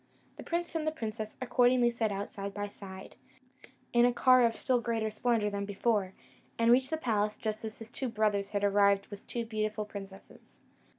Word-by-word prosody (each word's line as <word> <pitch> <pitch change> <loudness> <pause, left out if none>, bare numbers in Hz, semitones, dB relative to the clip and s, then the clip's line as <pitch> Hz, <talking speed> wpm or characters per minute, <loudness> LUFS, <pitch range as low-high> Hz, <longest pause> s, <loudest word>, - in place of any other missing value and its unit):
The - - -8
prince 340 0 -2
and 310 -1 -1
princess 220 -4 -5
accordingly 245 -1 +3
set 225 -2 -1
out 200 +1 -4
side 200 0 -5
by 205 0 -3
side, 190 -1 -11 0.8
in 240 0 +5
a 245 - +5
car 255 +1 +5
of 230 -1 +2
still 255 -3 +1
greater 225 -2 -1
splendour 215 -1 +1
than 200 0 -2
before, 200 -1 0 0.4
and 230 0 +4
reached 260 +2 +4
the 315 - -1
palace 215 -7 0
just 215 0 -3
as 220 -1 -6
the 225 - -9
two 245 +3 -4
brothers 210 -3 0
had 205 -1 -2
arrived 200 0 +4
with 205 0 -10
two 235 -1 -3
beautiful 215 -1 -2
princesses. 195 -2 -11
215 Hz, 185 wpm, -31 LUFS, 205-240 Hz, 0.8 s, in